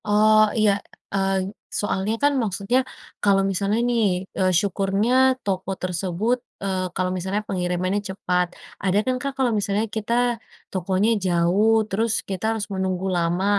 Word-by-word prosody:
Oh, 215 +1 +5
iya, 215 -2 +4 0.4
eng 195 0 0 0.3
soalnya 205 0 -1
kan 290 0 +4
maksudnya 210 +3 0 0.4
kalau 195 -1 +4
misalnya 200 +4 0
nih, 235 -2 +2 0.4
eee, 185 -1 +3
syukurnya 210 +7 +2
toko 190 -1 -2
tersebut, 185 +6 -1 0.3
eee, 185 -2 -1
kalau 185 0 0
misalnya 190 +3 -2
pengirimannya 185 +2 -1
cepat, 180 -2 0 0.4
ada 190 0 +2
kan, 255 -1 +1
Kak, 275 0 -4
kalau 255 -3 +2
misalnya 205 +1 0
kita 235 +2 0 0.3
tokonya 190 +3 +1 0.2
jauh, 190 +6 +3
terus 225 +4 0 0.2
kita 190 0 -4
harus 220 -2 -2
menunggu 190 0 -1
lama. 175 +2 0
195 Hz, 135 wpm, -23 LUFS, 185-220 Hz, 0.4 s, Oh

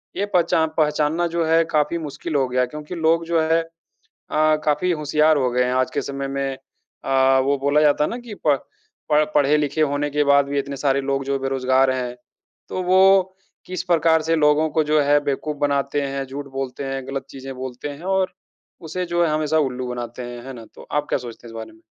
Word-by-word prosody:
ये 200 - 0
पहचान 165 -2 +3
पहचानना 150 +2 +1
जो 170 0 -1
है 165 +1 +4
काफ़ी 150 +2 +1
मुश्किल 155 0 -5
हो 135 -2 +2
गया। 125 0 +1
क्योंकि 150 +5 -8
लोग 165 0 +2
जो 165 -1 +1
है 160 +1 +2 0.7
अ, 155 0 +3
काफ़ी 155 +4 +1
होशियार 150 -1 +2
हो 130 -3 +1
गए 125 +1 +2
हैं 125 - 0
आज 130 0 +1
के - - -1
समय 140 0 -4
में 135 -1 -3 0.5
अ, 135 0 +3
वो 140 +1 +1
बोला 140 +2 +2
जाता 150 -1 +3
है - - 0
ना 235 - -4
कि 240 -3 -9
प - - +1
प 145 -2 +4 0.5
पढ़ 150 0 +4
पढ़े-लिखे 150 +1 +2
होने 145 0 +1
के 150 +1 +1
बाद 140 0 +4
भी 140 +1 -3
इतने 140 0 -4
सारे 140 -1 +1
लोग 135 0 -1
जो 140 0 0
बेरोज़गार 130 0 +2
हैं। 125 -1 -3 0.5
तो 185 - -3
वो 190 +1 +5 0.3
किस 185 -1 -4
प्रकार 165 -2 +3
से 165 +1 +1
लोगों 150 0 +3
को 155 - +2
जो 150 0 +2
है 145 +1 +4
बेवकूफ़ 145 +1 -2
बनाते 140 0 0
हैं, 135 -1 -3
झूठ 140 +2 -7
बोलते 135 0 -4
हैं, 135 -1 -4
ग़लत 135 -1 -4
चीज़ें 135 0 -8
बोलते 130 +2 -6
हैं 145 +3 -9
और 185 -1 0 0.6
उसे 180 +3 -2
जो 175 0 +1
है 160 - 0
हमेशा 155 0 +1
उल्लू 125 0 -5
बनाते 120 0 -5
हैं। 120 0 -7
है 135 - -6
ना? 115 -2 -10
तो - - -13
आप 150 0 -1
क्या - - +1
सोचते 120 -1 -10
हैं - - -10
इस - - -12
बारे 110 0 -7
में? 110 0 -21
145 Hz, 220 wpm, -22 LUFS, 135-160 Hz, 0.7 s, वो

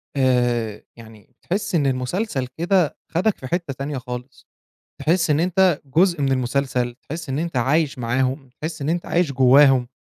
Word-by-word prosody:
آآ 120 -5 +1
يعني 110 -3 -15
بتحس 185 0 -2
إن 145 -4 +2
المسلسل 130 - -2
كده 175 -1 +1
خدك 190 +5 0
في 130 - -8
حتة 170 -3 -2
تانية 140 +1 -4
خالص، 125 0 -8 0.5
تحس 170 0 +1
إن 150 +2 +3
أنت 180 -2 +2
جزء 170 +4 +2
من 135 -1 +2
المسلسل، 125 -1 -1
تحس 160 0 -6
إن 135 +2 -2
أنت 170 -4 -3
عايش 140 +3 +1
معاهم، 130 +3 -1
تحس 155 -1 -5
إن 145 - -2
أنت 170 +1 -1
عايش 170 -4 +1
جواهم، 130 -1 +5
140 Hz, 160 wpm, -22 LUFS, 125-170 Hz, 0.5 s, جواهم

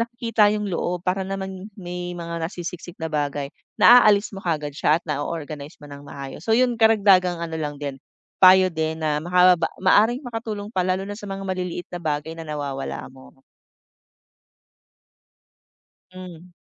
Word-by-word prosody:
nakikita 230 -2 +1
'yong 210 -1 -2
loob 175 0 -2
para 190 +1 0
naman 190 0 -6
may 180 -1 -6
mga 170 -1 -5
nasisiksik 175 0 -7
na 160 - -2
bagay, 145 -2 -2 0.3
naaalis 215 -4 +7
mo 195 - -7
kaagad 150 -4 -2
siya 155 +3 +2
at - - -71
na-o-organize 150 0 -5
mo 145 - -11
ng 140 0 -11
maayos. 140 +4 -9
So 220 - +2
'yon 245 -1 +2
karagdagang 195 -6 +4
ano 165 -1 -4
lang 145 -1 -5
din, 140 -2 -4 0.4
payo 185 0 +7
din 160 0 -3
na 150 -1 +1
makababa 180 -1 +4
maaring 225 +7 +4
makatulong 220 -3 -5
pa 185 -1 0
lalo 185 +1 0
na 205 - -6
sa 205 - -10
mga 195 0 -5
maliliit 180 -1 -4
na 175 - -5
bagay 155 0 -3
na 165 - -7
nawawala 140 -3 -5
mo. 130 0 -17 2.7
Hmm. 180 -1 -11
180 Hz, 155 wpm, -23 LUFS, 155-195 Hz, 2.7 s, naaalis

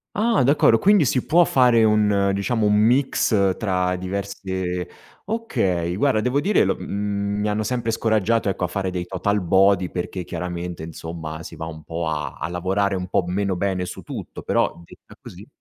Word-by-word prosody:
Ah. 210 - 0 0.2
D'accordo, 130 -3 +4
quindi 200 -5 +4
si 125 0 0
può 175 +2 +5
fare 125 -3 +4
un, 105 -2 +3
diciamo, 105 +3 0
un 105 - +3
mix 110 -4 +2
tra 90 -3 0
diverse 95 -1 -4 0.4
okay, 95 - -1
guarda 120 -2 +2
devo 125 +5 +1
dire 200 +8 +3
lo - - +1
mhmm, 100 0 -2
mi 105 - 0
hanno 105 +1 -1
sempre 120 +1 -2
scoraggiato, 110 0 +1
ecco, 95 - -3
a - - +2
fare 95 +2 -2
dei 90 -1 -3
total 100 +3 -1
body 95 +1 +3
perché 90 +1 -4
chiaramente, 85 0 -5
insomma, 80 0 -7
si - - -9
va 80 - -6
un 80 -1 -9
po' 80 +2 -4
a 75 -3 -3
a - - -2
lavorare 95 +3 0
un 90 0 -4
po' 95 - +1
meno 95 +1 -1
bene 90 0 -1
su 90 - -8
tutto, - - -7
però - - 0
detta - - -17
così - - -12
100 Hz, 180 wpm, -22 LUFS, 90-110 Hz, 0.4 s, può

